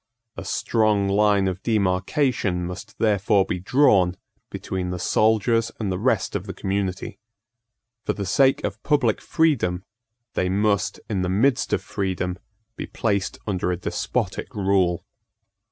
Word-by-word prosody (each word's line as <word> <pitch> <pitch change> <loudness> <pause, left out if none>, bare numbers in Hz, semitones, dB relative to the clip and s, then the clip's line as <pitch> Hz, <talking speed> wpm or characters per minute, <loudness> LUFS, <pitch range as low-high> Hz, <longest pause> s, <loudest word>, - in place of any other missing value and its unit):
A - - -6
strong 110 -3 +1
line 100 -1 +3
of 95 0 -3
demarcation 100 - 0
must 95 +5 -8
therefore 100 -2 +2
be 90 - -3
drawn 95 -5 +3 0.3
between 90 -1 -4
the 90 - -3
soldiers 110 +4 +2
and 105 -4 -1
the 90 - -2
rest 110 -4 0
of 100 +1 -3
the 95 - -6
community. 95 -1 -3 0.9
For - - 0
the 100 - -4
sake 135 +8 +3
of 100 +2 -4
public 140 -8 +1
freedom, 115 - +1 0.5
they 90 - 0
must, 100 -1 +1
in 100 -4 -1
the 90 - -1
midst 115 +7 +2
of - - 0
freedom, 95 -1 -3 0.4
be - - -6
placed 100 -4 -1
under 90 -3 -1
a 90 - -1
despotic 90 - -3
rule. 95 -3 +1
100 Hz, 140 wpm, -23 LUFS, 95-110 Hz, 0.9 s, line